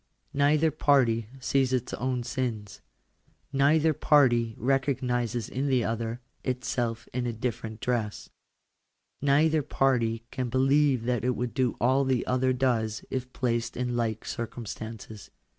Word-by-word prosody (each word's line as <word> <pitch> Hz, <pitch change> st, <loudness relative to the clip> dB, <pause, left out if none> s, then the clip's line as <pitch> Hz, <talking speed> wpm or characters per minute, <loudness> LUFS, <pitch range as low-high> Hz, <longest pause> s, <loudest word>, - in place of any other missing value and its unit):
Neither 150 Hz, +3 st, +3 dB
party 125 Hz, -7 st, +2 dB
sees 130 Hz, 0 st, +1 dB
its 125 Hz, -2 st, -1 dB
own 125 Hz, 0 st, -2 dB
sins. 115 Hz, -5 st, -4 dB, 0.7 s
Neither 150 Hz, +3 st, +4 dB
party 120 Hz, -7 st, +3 dB
recognises 125 Hz, -3 st, 0 dB
in 135 Hz, +3 st, -2 dB
the 130 Hz, -3 st, +2 dB
other, 115 Hz, +2 st, -3 dB, 0.2 s
itself 120 Hz, -2 st, -2 dB
in 125 Hz, 0 st, -1 dB
a 120 Hz, -, -2 dB
different 110 Hz, -1 st, -4 dB
dress. 115 Hz, -4 st, -2 dB, 0.9 s
Neither 150 Hz, +3 st, +3 dB
j 145 Hz, -, -14 dB
party 115 Hz, -5 st, +1 dB
can 130 Hz, -2 st, -3 dB
believe 135 Hz, 0 st, +3 dB
that 120 Hz, -2 st, -1 dB
it 125 Hz, 0 st, +1 dB
would 125 Hz, -2 st, -3 dB
do 130 Hz, -2 st, +1 dB
all 130 Hz, +3 st, +3 dB
the 130 Hz, -2 st, 0 dB
other 130 Hz, 0 st, +1 dB
does 120 Hz, -4 st, 0 dB
if 130 Hz, -1 st, -3 dB
placed 120 Hz, -2 st, -1 dB
i -, -, -2 dB
in 125 Hz, -1 st, -1 dB
like 110 Hz, -2 st, -1 dB
circumstances. 110 Hz, -3 st, -6 dB
125 Hz, 140 wpm, -28 LUFS, 115-135 Hz, 0.9 s, Neither